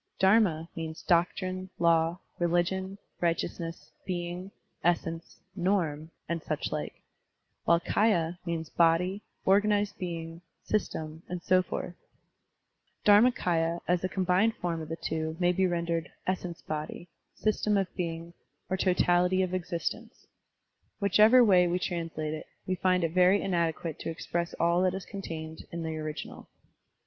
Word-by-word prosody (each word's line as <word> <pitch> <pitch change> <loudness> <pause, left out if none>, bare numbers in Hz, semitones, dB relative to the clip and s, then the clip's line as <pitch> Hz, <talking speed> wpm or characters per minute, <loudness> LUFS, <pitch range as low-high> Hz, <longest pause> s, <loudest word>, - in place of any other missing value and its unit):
Dharma 190 -5 +4
means 160 -1 -6
"doctrine," 185 +1 +1
"law," 165 0 +3 0.2
"religion," 180 +3 0 0.2
"righteousness," 165 0 -2
"being," 175 +1 -4 0.3
"essence," 165 -1 -1 0.2
"norm," 170 -5 0 0.2
and 170 -1 -2
such - - -3
like; - - -5 0.6
while 170 0 +5
kdya 175 -3 +2
means 165 -2 -3
"body," 175 +5 +2 0.2
"organ 205 +2 +4
ized 205 0 +1
being," 165 -2 -5 0.2
"system," 160 -6 -2
and 180 -1 -4
so 185 0 +4
forth, 180 -1 -5 1.1
Dhar 205 0 +8
makS, 250 0 +1
ya 165 -1 +2
as 180 0 +1
a 185 - 0
combined 190 +4 +2
form 170 -2 -2
of 155 - -7
the 165 - -2
two 160 0 -3
may 175 -1 +4
be 185 +1 +2
rendered 170 -1 -1 0.2
"essence 180 -2 -3
body," 155 +3 -5 0.3
"system 210 -1 +1
of 195 - +2
being," 170 -1 -4 0.4
or 190 - +1
"totality 180 0 +3
of 185 -1 -3
existence." 185 +6 -4 0.7
Whichever 215 +5 +6
way 185 -5 +5
we 175 +1 +1
translate 165 -4 -3
it, 155 - -6 0.2
we 185 - 0
find 185 -1 +2
it 165 - +1
very 185 +2 +5
inadequate 170 -4 -1
to - - -4
express 170 +1 -3
all 170 +1 +2
that 185 0 +2
is 190 - -6
contained 160 -5 -7
in 170 0 -4
the 160 -1 -3
original. 155 -1 -6
175 Hz, 140 wpm, -29 LUFS, 165-185 Hz, 1.1 s, Dhar